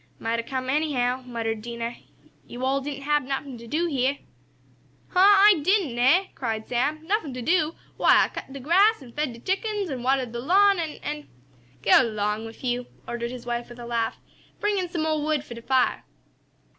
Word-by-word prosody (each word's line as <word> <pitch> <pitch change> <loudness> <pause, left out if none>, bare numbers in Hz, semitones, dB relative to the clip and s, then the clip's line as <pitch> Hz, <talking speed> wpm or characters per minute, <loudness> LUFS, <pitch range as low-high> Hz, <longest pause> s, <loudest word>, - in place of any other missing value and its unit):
"Might 230 +1 -1
a' - - -2
come 255 +1 -4
anyhow," 260 -3 0
muttered 225 -2 -3
Dinah. 235 +1 -5 0.5
"Yo' 250 +2 -5
all 270 +1 +1
didn't 280 0 -6
hab 295 +1 +2
nuffin' 270 -1 -5
t' 235 - -11
do 320 +8 0
heah!" 275 -3 0 0.9
"Huh! 360 - 0
I 400 -1 +7
didn't, 350 - +1
eh?" 310 +11 +5
cried 225 -3 -3
Sam. 290 +6 -1
"Nuffin 335 - -1
t' 250 - -5
do! 330 +1 +2 0.2
Why, - - +6
I - - -1
cut - - -8
de 275 - -7
grass, 365 - +3
an' 245 - -13
fed 295 0 -2
de 235 - -11
chickens, 395 - -2
an' 255 -2 -4
watered 260 -1 +1
de 235 - -5
lawn, 390 +8 +4
an' 315 -3 -3
an' 300 0 -5 0.3
" 120 +1 -31
"Go - - +7
'long 215 -2 -1
wif 225 +3 -11
yo'," 245 -1 -1 0.2
ordered 235 0 -3
his 245 -1 -8
wife 240 0 -3
with 240 - -11
a 240 - -8
laugh. 235 -1 -1 0.4
"Bring 415 -1 +1
in 360 -2 -2
some 330 -2 -2
mo' 310 -1 0
wood 300 -1 0
for 245 - -9
de 235 - -9
fire!" 260 +1 +1
265 Hz, 205 wpm, -25 LUFS, 240-315 Hz, 0.9 s, I